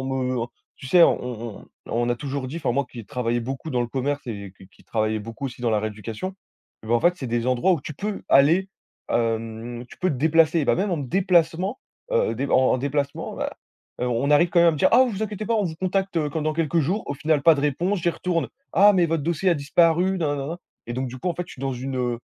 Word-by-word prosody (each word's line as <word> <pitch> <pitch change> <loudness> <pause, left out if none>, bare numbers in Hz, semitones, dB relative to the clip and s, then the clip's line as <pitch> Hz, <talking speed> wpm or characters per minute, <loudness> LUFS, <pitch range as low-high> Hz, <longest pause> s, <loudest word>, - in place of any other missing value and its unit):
en - - -4
me 130 -3 -1 0.3
tu - - -9
sais, 175 +6 +6
on 120 -7 +1
on - - -15 0.2
on 120 +1 0
a - - +2
toujours 140 0 -4
dit, 155 - -6
enfin 160 - -1
moi 140 +3 +1
qui 125 - -10
ai 115 - -7
travaillé 120 +2 -1
beaucoup 135 +6 -5
dans 125 -3 0
le 120 - 0
commerce 140 +3 -2
et 100 -5 -6
qui 95 - -15
qui - - -24
travaillait 110 -1 0
beaucoup 115 +5 -6
aussi 125 -1 -9
dans 120 - +1
la 105 -1 +2
rééducation. 110 - -5 0.5
Et - - -12
bah, 115 - -1
en 120 - +3
fait, 175 +5 +4
c'est 135 - -5
des 120 0 -1
endroits 130 +9 +3
où 165 - 0
tu 155 - -7
peux 205 +6 -4
aller, 165 +8 +5 0.4
hem, 115 +1 -2
tu - - -14
peux 185 - +1
te 145 - -2
déplacer, 160 +2 +3
bah - - +4
même 195 +2 -1
en 175 - 0
me 140 - -4
déplacement, 180 - +1 0.3
heu, 485 0 +2
dé - - -2
en 130 0 +4
déplacement. 140 +2 -2
Bah, - - -3 0.5
heu, 125 - +1
on 125 +4 0
arrive 165 +4 +5
quand 175 - +3
même 170 - +6
à - - +6
me - - -3
dire: - - +3
«Ah, 250 +3 +7
vous 215 -2 -4
inquiétez 215 0 -4
pas, 230 - +1
on 215 -2 +1
vous 160 -3 -4
contacte 185 -3 -1
quand 155 +2 -3
dans 155 +1 0
quelques 165 +1 +1
jours». 180 +9 -1
Au 140 - -3
final, 150 +1 +1
pas 165 +2 +7
de 140 - -2
réponse, 175 +7 0
j'y 170 - +3
retourne: 170 -1 -2 0.3
«Ah, 205 +2 +7
mais 180 -3 +3
votre 165 -2 -1
dossier 170 +4 0
a 175 - +4
disparu» 170 +5 +2
nananana 145 +1 -2 0.3
et 120 - -4
donc 130 +1 -2
du 125 - -8
coup, 180 - -1
en - - -3
fait, 180 - -3
je - - -11
suis - - -13
dans 135 - -1
une 125 -1 -2
145 Hz, 260 wpm, -24 LUFS, 125-170 Hz, 0.5 s, Ah